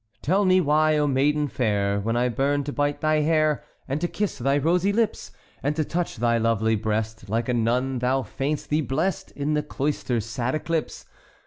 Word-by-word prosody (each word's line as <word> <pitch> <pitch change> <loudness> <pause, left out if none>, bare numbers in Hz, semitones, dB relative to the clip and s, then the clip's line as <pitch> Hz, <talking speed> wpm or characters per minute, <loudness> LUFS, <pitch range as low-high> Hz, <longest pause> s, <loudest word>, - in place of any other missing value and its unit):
"Tell 195 +6 +2
me 185 0 +5
why, 155 -1 +3
O 150 - +2
maiden 145 +2 +2
fair, 100 -6 0
When 115 +3 -1
I 125 +1 +2
burn 140 +4 0
to 145 +1 -5
bite 145 0 -1
thy 155 -1 +2
hair, 155 0 +2 0.2
And 140 +3 -2
to 175 - +1
kiss 210 +3 -3
thy 135 +3 +2
rosy 175 +6 +2
lips, 225 +1 -1 0.3
And 145 +2 0
to 155 -1 0
touch 175 +3 -2
thy 115 +1 +1
lovely 110 -1 +2
breast, 110 -1 -3
Like 115 +2 -1
a 125 - 0
nun 125 +3 0
thou 130 +2 +1
feign'st 145 +4 -3
thee 150 +1 +2
blest 155 +7 -1
In 145 +2 -2
the 150 - +2
cloister's 140 -6 -2
sad 120 +4 -2
eclipse? 160 +1 -3
140 Hz, 195 wpm, -24 LUFS, 120-155 Hz, 0.3 s, me